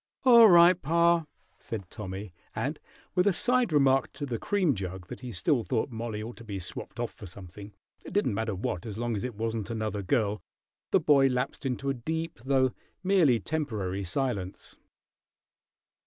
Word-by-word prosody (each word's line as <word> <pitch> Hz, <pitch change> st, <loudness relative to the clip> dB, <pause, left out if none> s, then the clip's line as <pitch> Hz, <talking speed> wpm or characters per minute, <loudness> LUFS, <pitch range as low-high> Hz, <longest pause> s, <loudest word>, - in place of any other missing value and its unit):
"All 235 Hz, -3 st, +9 dB
right, 175 Hz, 0 st, +7 dB
pa," 170 Hz, +2 st, +3 dB, 0.3 s
said 105 Hz, -5 st, -6 dB
Tommy; 95 Hz, -2 st, -6 dB, 0.2 s
and -, -, -2 dB, 0.3 s
with 180 Hz, +2 st, +2 dB
a 200 Hz, -, +4 dB
side 245 Hz, +2 st, +2 dB
remark 135 Hz, -3 st, +3 dB
to 145 Hz, -, -5 dB
the 120 Hz, -5 st, -3 dB
cream 190 Hz, -8 st, +1 dB
jug, 95 Hz, -3 st, -5 dB
that -, -, -7 dB
he 125 Hz, -1 st, -7 dB
still 120 Hz, -, +1 dB
thought 125 Hz, +3 st, -1 dB
Mollie 110 Hz, -2 st, -4 dB
ought 120 Hz, +2 st, -8 dB
to -, -, -11 dB
be 105 Hz, -3 st, -5 dB
swapped 90 Hz, -, -5 dB
off -, -, -2 dB
for 105 Hz, -, -11 dB
something, 100 Hz, +3 st, -10 dB, 0.3 s
it -, -, -9 dB
didn't 205 Hz, -, +1 dB
matter 110 Hz, 0 st, -2 dB
what 90 Hz, +1 st, -3 dB
as 105 Hz, -1 st, -6 dB
long 120 Hz, 0 st, -1 dB
as 100 Hz, -, -3 dB
it 125 Hz, -3 st, -4 dB
wasn't 110 Hz, -1 st, -3 dB
another 110 Hz, -3 st, -2 dB
girl, 105 Hz, +2 st, 0 dB, 0.5 s
the -, -, +4 dB
boy 140 Hz, -2 st, +5 dB
lapsed 125 Hz, +2 st, -2 dB
into 135 Hz, +2 st, -3 dB
a -, -, 0 dB
deep 160 Hz, +6 st, -4 dB
though 130 Hz, -2 st, +2 dB, 0.3 s
merely 175 Hz, -11 st, +4 dB
temporary 105 Hz, -7 st, -3 dB
silence. 100 Hz, -2 st, -3 dB
120 Hz, 175 wpm, -28 LUFS, 105-150 Hz, 0.5 s, All